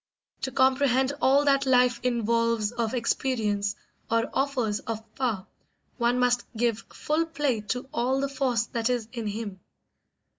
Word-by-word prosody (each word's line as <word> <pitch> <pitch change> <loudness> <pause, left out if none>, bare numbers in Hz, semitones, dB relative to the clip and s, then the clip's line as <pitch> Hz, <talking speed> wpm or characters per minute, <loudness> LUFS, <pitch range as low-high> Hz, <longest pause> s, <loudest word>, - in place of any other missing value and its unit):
To 265 - -2
comprehend 260 +1 +3
all 280 +2 +4
that 275 -1 +3
life 250 -2 +4
involves 230 -2 +1
of 235 0 -2
experience, 215 -4 0 0.3
or 230 0 +1
offers 255 -6 0
of 225 -1 -5
power, 225 -7 -1 0.5
one 240 +1 +2
must 245 -1 +2
give 230 -1 +1
full 320 +2 -1
play 290 -8 -1
to 250 +4 -2
all 260 0 +1
the 275 - 0
force 260 -4 0
that 230 0 -1
is 240 -3 -1
in 230 -3 -4
him. 205 -2 -5
245 Hz, 145 wpm, -27 LUFS, 230-265 Hz, 0.5 s, all